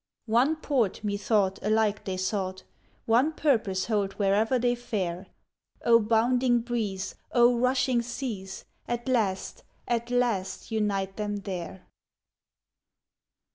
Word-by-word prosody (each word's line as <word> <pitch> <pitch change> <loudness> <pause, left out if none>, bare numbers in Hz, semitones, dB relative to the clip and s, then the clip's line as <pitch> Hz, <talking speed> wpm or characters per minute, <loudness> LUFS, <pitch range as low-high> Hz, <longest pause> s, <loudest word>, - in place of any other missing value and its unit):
One 245 +7 +3
port, 260 - -1
methought, 200 -1 +1
alike 215 0 +1
they 190 -1 -3
sought, 185 -1 -2 0.4
One 250 +8 +3
purpose 220 -12 +1
hold 205 -3 0
where'er 210 +5 +2
they 245 0 +2
fare; 195 -7 -3 0.6
O 230 -1 +7
bounding 240 +2 +2
breeze, 220 -5 -3 0.2
O 240 0 +5
rushing 255 -1 +2
seas, 230 -6 -6 0.2
At 240 +1 -3
last, 215 -7 -1 0.2
at 235 0 -1
last, 240 -6 -1
unite 200 -3 -1
them 210 -1 -2
there! 185 -1 -6
220 Hz, 110 wpm, -27 LUFS, 195-240 Hz, 0.6 s, O